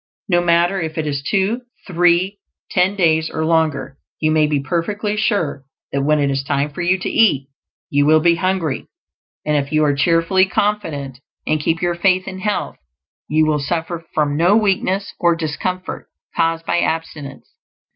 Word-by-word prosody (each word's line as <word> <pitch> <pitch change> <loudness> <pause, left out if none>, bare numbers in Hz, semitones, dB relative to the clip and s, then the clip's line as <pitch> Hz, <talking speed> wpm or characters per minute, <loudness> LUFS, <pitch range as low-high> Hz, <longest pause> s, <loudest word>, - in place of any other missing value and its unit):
No 175 -3 +3
matter 175 +2 +2
if 160 -1 -5
it 160 - -1
is 140 -2 -2
two, 200 - 0 0.2
three, 180 +2 +2 0.3
ten 185 +2 +2
days, 160 -4 +2
or 160 0 -2
longer; 155 -4 0 0.2
you 155 0 +1
may 155 -1 +3
be 150 -1 0
perfectly 200 +8 -2
sure 200 - -1 0.3
that 140 - -1
when 150 +2 +2
it 140 -1 +1
is 135 0 0
time 140 +2 -1
for 165 - -6
you 180 +2 +2
to 180 - -5
eat 140 -12 +2 0.4
you 145 0 +3
will 155 +1 +6
be 170 +2 +4
hungry; 175 -5 -1 0.6
and 150 - +1
if 140 -1 -1
you 155 0 +3
are 145 -1 +3
cheerfully 165 +6 +3
confident 160 -12 -2 0.3
and 155 0 +1
keep 165 +3 -1
your 175 0 +1
faith 185 +1 +1
in 190 -1 -6
health, 210 +1 -2 0.5
you 155 +1 +3
will 155 -1 +1
suffer 165 +3 -3
from 150 -2 +1
no 175 +7 +4
weakness 195 -2 0
or 170 -1 +3
discomfort 175 +3 -4 0.3
caused 165 0 0
by 175 - +1
abstinence. 160 -5 -4
165 Hz, 175 wpm, -19 LUFS, 150-185 Hz, 0.6 s, will